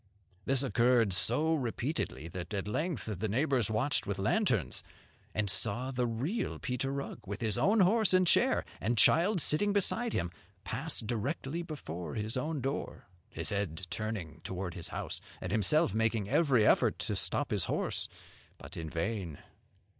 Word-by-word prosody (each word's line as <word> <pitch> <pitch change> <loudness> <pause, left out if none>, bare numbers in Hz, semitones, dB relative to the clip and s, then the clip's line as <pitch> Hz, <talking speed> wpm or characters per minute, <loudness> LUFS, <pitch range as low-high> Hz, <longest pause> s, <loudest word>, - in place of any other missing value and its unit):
This 135 0 +1
occurred 120 -5 +3
so 150 - +2
repeatedly 120 - -2
that 90 +3 -5
at 100 0 -2
length 150 +6 -2
the 110 - 0
neighbours 125 +1 +1
watched 115 +7 +1
with 100 -1 -2
lanterns, 110 - 0 0.5
and 105 -1 +1
saw 120 +7 -1
the 125 -2 0
real 135 - -2
Peter 130 0 -2
Rugg, 140 0 -4
with 100 +3 -5
his 110 -3 +1
own 200 - +3
horse 210 +2 +4
and 185 0 +5
chair, - - +3
and 115 +4 0
child 180 - +5
sitting 200 +7 +2
beside 220 +3 +1
him, 85 0 -1 0.3
pass 135 +9 +1
directly 135 +8 -2
before 90 - -6
his 110 +2 -1
own 150 +2 -2
door, 135 -8 -4 0.2
his - - -4
head 95 -4 -2
turning 100 -8 -4
toward 95 -2 -4
his 85 - -6
house, - - -4 0.2
and 90 - -5
himself 110 - +3
making 110 -2 +1
every 130 -4 +3
effort - - +4
to - - -2
stop - - -1
his - - +1
horse, - - -2 0.5
but - - -10
in 80 -2 -5
vain. 85 -1 -3
115 Hz, 160 wpm, -32 LUFS, 100-150 Hz, 0.5 s, and